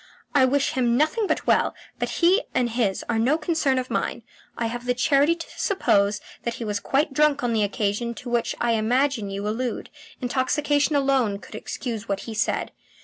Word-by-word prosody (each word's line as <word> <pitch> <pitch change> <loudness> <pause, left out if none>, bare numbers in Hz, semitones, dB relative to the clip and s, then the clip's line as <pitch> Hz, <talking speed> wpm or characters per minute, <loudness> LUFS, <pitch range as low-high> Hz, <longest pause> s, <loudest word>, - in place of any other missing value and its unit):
I 275 -3 +5
wish 275 +1 +1
him 240 -2 +1
nothing 355 - +1
but - - -1
well, - - +2 0.2
but - - -1
he 370 +6 +3
and 240 -2 +1
his 225 -5 0
are 225 -1 0
no 265 +7 +3
concern 310 -4 +1
of 255 0 -3
mine. - - -2 0.3
I 235 - -1
have 240 +2 -4
the 245 - +2
charity 280 +5 +3
to 335 - -8
suppose 205 - +2 0.2
that 235 -1 -3
he 230 - -5
was 205 -1 -1
quite 275 +7 0
drunk 295 -1 +3
on 240 -1 +1
the 220 - +2
occasion 210 +3 -1
to 245 +3 -8
which 240 -1 0
I 240 - +1
imagine 230 0 +1
you 200 +1 -4
allude. 235 +3 -3 0.3
Intoxication 290 +4 +1
alone 270 -7 +2
could - - -14
excuse 225 -4 -5
what 195 -1 -1
he 225 - -7
said. 215 - -1
245 Hz, 195 wpm, -24 LUFS, 225-285 Hz, 0.3 s, I